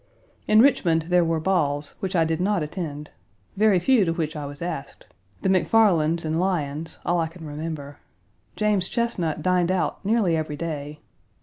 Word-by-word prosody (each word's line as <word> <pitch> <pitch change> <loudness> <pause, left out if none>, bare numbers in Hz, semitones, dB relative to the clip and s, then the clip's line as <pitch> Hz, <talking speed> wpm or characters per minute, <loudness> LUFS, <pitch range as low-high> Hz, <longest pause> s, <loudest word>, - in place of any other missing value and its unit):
In 215 +2 +6
Richmond, 175 - +3
there 180 0 +4
were 165 -1 0
balls, 150 -5 0
which 190 -1 -3
I 165 -2 +3
did 160 +1 -1
not 195 -3 +1
attend 150 -2 -6 0.4
very 210 -1 +4
few 225 +5 +3
to 165 - 0
which 160 -1 -3
I 145 -2 -5
was 145 0 -9
asked: 170 -5 -6 0.4
the - - +2
MacFarlands' 175 -5 +3
and 160 +1 -1
Lyons's, 160 -4 -2
all 175 0 +1
I 165 - 0
can 165 0 -12
remember. 150 -1 -6 0.6
James 210 -3 +1
Chesnut 180 -11 -1
dined 180 0 +2
out 185 +1 -1
nearly 205 -5 +2
every 155 -2 -3
day. 150 -2 -5
165 Hz, 170 wpm, -24 LUFS, 155-190 Hz, 0.6 s, In